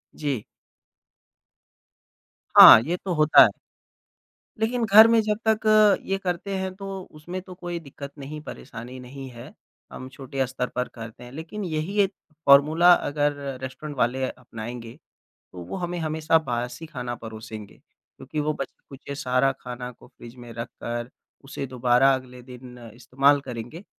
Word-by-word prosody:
जी। 140 -8 -3 2.1
हाँ, - - +12
ये 165 +9 -2
तो 185 0 -4
होता 155 -1 +7
है। - - +4 1.1
लेकिन 230 +2 0
घर 215 +2 +8
में 230 0 +4
जब 210 -1 -1
तक 220 -1 +3 0.5
ये 195 - -1
करते 185 +2 -3
है 190 0 -2
तो 195 +1 -8 0.3
उसमें 175 +4 -6
तो 185 0 -12
कोई 175 -1 -6
दिक़्क़त 140 -2 -10
नहीं 145 +2 -7
परेशानी 125 -3 -9
नहीं 135 +2 -9
है। 120 -1 -12 0.4
हम 130 - -8
छोटे 135 0 -4
स्तर 125 0 -3
पर 125 0 -1
करते 115 0 -10
हैं 120 - -11
लेकिन 160 +9 -7
यही 165 +4 -3
1 195 0 0 0.3
फ़ॉर्मूला 155 +5 +6
अगर 145 -3 0 0.3
रेस्टोरेंट 135 +3 -7
वाले 125 +2 0
अपनाएँगे 115 -1 -9 0.6
तो 90 - -8
वो 85 - -6
हमें 175 0 -3
हमेशा 160 0 +1
बासी 125 +4 -4
खाना 125 -6 -5
परोसेंगे 110 -2 -9
क्योंकि 150 +4 -9
वो 150 +1 0
बचे-कुचे 135 0 -8
सारा 130 0 +1
खाना 125 0 -7
को 125 - -18
फ़्रिज 120 -2 -14
में 120 -1 -11
रखकर 120 +1 -6 0.3
उसे 135 0 -6
दोबारा 125 +1 +3
अगले 125 -1 -8
दिन 125 0 -12 0.2
इस्तेमाल 135 +4 +2
करेंगे। 125 - -8
135 Hz, 150 wpm, -24 LUFS, 125-160 Hz, 2.1 s, हाँ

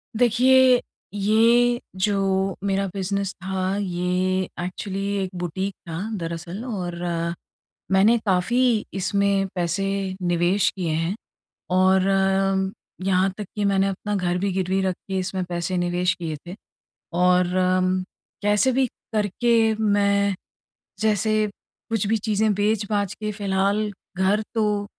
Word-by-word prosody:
देखिए, 250 +2 +5 0.3
ये 230 +4 +3 0.2
जो 195 -1 +1
मेरा 195 0 0
बिज़नेस 195 0 -2
था, 190 0 -1
ये 185 0 0 0.2
एक्चुअली 195 +2 -4 0.2
एक 185 - -3
बुटीक 190 +3 -3 0.2
था, 165 +1 -4 0.2
दरअसल 170 +4 -5
और 180 -7 -4 1.0
मैंने 205 +5 +5
काफ़ी 220 +5 +2
इसमें 195 0 +1
पैसे 175 +2 0 0.4
निवेश 175 +2 +2
किए 180 -4 -2
हैं 165 +5 -1 0.6
और 190 0 +4 1.0
यहाँ 190 0 +3
तक 210 - -3
कि 205 - 0
मैंने 195 0 +2
अपना 205 +2 -3
घर 180 -2 0
भी 200 +2 0
गिरवी 190 +1 0
रख 185 -1 0
के 190 0 -1
इसमें 185 0 -2
पैसे 175 +1 -2
निवेश 175 +1 +1
किए 165 -4 -5
थे 180 - -6 0.6
और 180 0 +3
अम, 185 0 +2 0.4
कैसे 210 +5 +3
भी 260 0 +2 0.3
करके 220 +2 +2
मैं, 200 -2 +2 0.7
जैसे 215 0 +2 0.4
कुछ 220 -3 +1
भी 225 - +2
चीज़ें 215 0 +1
बेच-बाच 205 -1 0
के 215 0 -4
फ़िलहाल, 200 +1 0 0.3
घर 195 +3 +2
तो 210 -2 +1
195 Hz, 120 wpm, -23 LUFS, 185-210 Hz, 1.0 s, देखिए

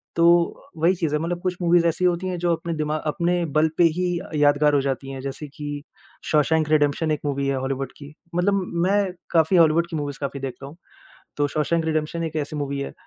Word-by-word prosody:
तो, 170 0 +3
वही 170 +4 +3
चीज़ 165 -4 -2
है 150 - +1
मतलब 175 +1 -3
कुछ 180 -1 -1
मूवीज़ 170 0 +4
ऐसी 170 +2 0
होती 180 +1 +1
है 180 -1 -2
जो 175 0 +1
अपने 170 +1 -5
दिमा 155 0 -1 0.2
अपने 175 -1 0
बल 155 +1 +4
पे 175 - +5
ही 180 -1 0
अ, - - -10
यादगार 145 0 +4
हो 140 - +3
जाती 135 0 -3
हैं, 135 -1 -6
जैसे 140 +2 -6
कि 145 -1 -5 0.5
शॉशैंक 155 0 +2
रिडेम्पशन 155 +1 +2
एक 150 - -1
मूवी 140 -1 -1
है 135 - +1
हॉलीवुड 135 0 -3
की, 145 -1 -11 0.2
मतलब 195 +2 +2 0.3
मैं 200 -2 +1 0.2
काफ़ी 165 +2 +4
हॉलीवुड 165 +1 +4
की 165 - -5
मूवीज़ 145 -1 -4
काफ़ी 140 0 -3
देखता 135 0 -6
हूँ। 150 +4 -12 0.6
तो 145 0 +1
शॉशैंक 165 +2 +1
रिडेम्पशन 160 +1 -1
एक 160 -1 -4
ऐसी 150 0 -3
मूवी 140 -1 -3
है। 140 - -5
155 Hz, 215 wpm, -23 LUFS, 145-170 Hz, 0.6 s, पे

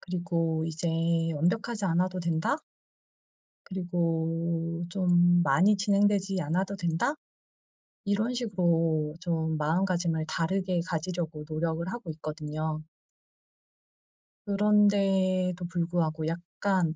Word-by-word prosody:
그리고 165 -3 -1
이제 165 +1 -3 0.5
완벽하지 210 +7 0
않아도 180 +2 +1
된다?' 170 - 0 1.1
'그리고 170 -2 -1
좀 175 -1 +4
많이 180 +9 +4
진행되지 200 -2 +2
않아도 185 +6 -1
된다?' 175 - 0 0.9
이런 210 +5 0
식으로 165 -9 +1
좀 160 -3 -1
마음가짐을 170 0 0
다르게 180 +2 0
가지려고 165 -2 -3
노력을 160 +2 -2
하고 230 -9 -6
있거든요. 155 0 -4 1.6
그런데도 195 -3 +3
불구하고 170 -2 -1
약간 170 0 -1
175 Hz, 235 characters per minute, -28 LUFS, 160-190 Hz, 1.6 s, 좀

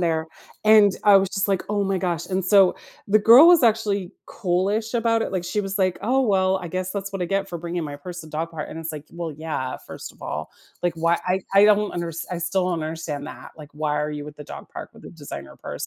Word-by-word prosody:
there, 160 -2 0 0.4
and, 215 -2 +7
I 205 -1 +8
was 195 0 +2
just 195 -1 -1
like, 195 -2 +1
"Oh, 205 -1 +1
my 195 -1 0
gosh," 175 -3 -2
and 190 -1 -1
so 190 -1 +5 0.3
the 210 +2 +5
girl 235 +8 +8
was 350 -5 +6
actually 210 -5 +1
cool-ish 205 +4 -1
about 230 -1 +2
it, - - -4
like, 185 -2 -2
she 180 +4 -1
was, 195 0 -3
like, 185 -2 +1
"Oh, 260 +4 +2
well, 190 -6 +2
I 175 - -7
guess 185 +2 -3
that's 200 -1 -5
what 195 - -3
I - - -1
get 195 +1 -1
for 175 - -5
bringing 170 0 -4
my 145 -1 -6
purse 175 +4 -8
to 160 - -12
dog 160 +2 -3
park," 160 -2 -5
and - - -7
it's 165 0 -5
like, 150 -1 -8
well, 170 -2 -5
yeah, 145 -4 -4
first - - -9
of - - -18
all, - - -5 0.3
like, 175 -2 0
why 170 +1 +2
I 185 +1 +1
I 200 +1 +7
don't 210 0 +3
unders 170 -1 -4
I 180 - -3
still 175 +2 0
don't 170 -3 -2
understand 155 -2 -5
that, - - -10
like, 150 -2 -12
why 150 0 -1
are 150 0 -2
you 150 -1 -5
with 150 0 -10
the 150 - -10
dog - - -10
park - - -8
with - - -17
the - - -10
designer 140 - -9
purse? - - -6
180 Hz, 255 wpm, -23 LUFS, 160-200 Hz, 0.4 s, I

